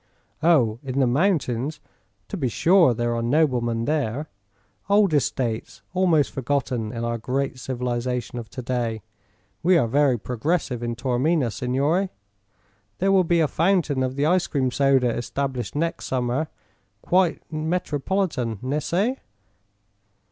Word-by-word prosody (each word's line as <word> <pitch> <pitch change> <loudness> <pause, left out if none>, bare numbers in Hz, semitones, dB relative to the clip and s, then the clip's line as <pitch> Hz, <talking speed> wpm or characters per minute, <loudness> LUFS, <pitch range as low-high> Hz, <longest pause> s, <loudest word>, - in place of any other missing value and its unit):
"Oh; 125 -10 +3
in 135 -1 -3
the 135 - +4
mountains? 140 - 0 0.5
To - - -4
be 145 -9 -1
sure 170 - +4
there 120 +1 -1
are 115 - -1
noblemen 120 -3 +1
there; 150 -1 -1 0.6
old 200 -4 +4
estates 125 -5 -1
almost 175 -6 +3
forgotten 125 -4 -2
in 115 -1 -4
our 115 0 -2
great 130 +2 -2
civilization 125 -1 -3
of 115 -2 -9
to 125 - -7
day. 115 -3 -2 0.6
We 180 +1 +4
are 120 - +2
very 135 +1 +3
progressive 125 +3 -2
in 120 -1 -2
Taormina, 130 +3 +1
signore. 140 - 0 0.9
There 195 +2 +2
will 190 -1 +5
be 170 -1 +2
a 155 - +3
fountain 165 -5 +1
of 130 0 -1
the 140 +1 +1
ice 180 +2 +2
cream 130 -3 0
soda 135 -2 +3
established 125 -2 -3
next 165 +3 -2
summer. 130 +4 -1 0.6
Quite 180 -2 +2
metropolitan, 155 - -1
ne 140 +4 0
c'e?" 205 - 0
135 Hz, 135 wpm, -24 LUFS, 120-160 Hz, 0.9 s, will